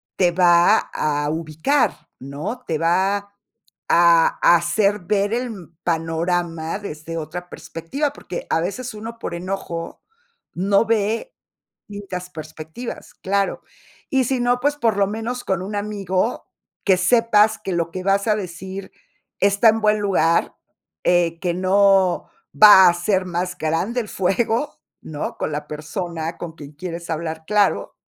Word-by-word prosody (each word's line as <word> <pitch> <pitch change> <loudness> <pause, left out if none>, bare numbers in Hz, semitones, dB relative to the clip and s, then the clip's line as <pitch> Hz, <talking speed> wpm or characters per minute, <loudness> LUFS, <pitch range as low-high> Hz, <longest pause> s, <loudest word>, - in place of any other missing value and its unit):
te 180 -2 +3
va 175 -1 +5
a 145 -1 -1
ubicar, 160 - 0
¿no? 150 - -6
Te 160 -2 0
va 190 +5 +2
a 200 0 -12 0.6
a 170 -1 +5 0.2
hacer 200 +5 +1
ver 200 +4 0
el 245 +1 -1
mm, 170 -5 -11
panorama 165 0 -1
desde 165 -4 -7
otra 175 +3 -6
perspectiva, 275 - -4
porque 175 - -7
a 160 - +2
veces 225 +7 -4
uno, 225 +2 -7
por 170 - -5
enojo, 175 -2 -5 0.5
no 195 +4 +2
ve 225 - 0 0.5
distintas 190 -3 -7
perspectivas, 160 +8 -8
claro. 200 +1 -1 0.5
Y 265 -2 +2
si 260 0 0
no, 245 0 +2
pues, 290 +1 +1
por 225 -6 +1
lo 200 -1 +3
menos 225 +4 -4
con 190 -1 -1
un 200 +3 -6
amigo, 205 +1 -2 0.4
que 190 -2 +4
sepas 220 +1 +3
que 195 - -5
lo 170 -1 -1
que 185 +1 -5
vas 200 +2 +1
a 210 - +3
decir 190 0 -7 0.5
está 200 +3 +4
en 225 +1 +2
buen 210 0 +3
lugar, 170 -5 +1 0.5
eh, 170 -1 +2
que 175 -2 -1
no 190 0 +3 0.3
va 195 -4 +10
a - - +2
ser 185 +2 0
más 180 +1 -3
grande 175 +10 -1
el 215 - -9
fuego, 225 +9 -1 0.2
¿no? 150 -2 -5
Con - - -2
la 150 0 -4
persona 165 +2 -5
con 165 -2 -7
quien 145 0 -11
quieres 170 +1 -7
hablar, 160 0 -4
claro 200 - +1
185 Hz, 145 wpm, -21 LUFS, 165-210 Hz, 0.6 s, va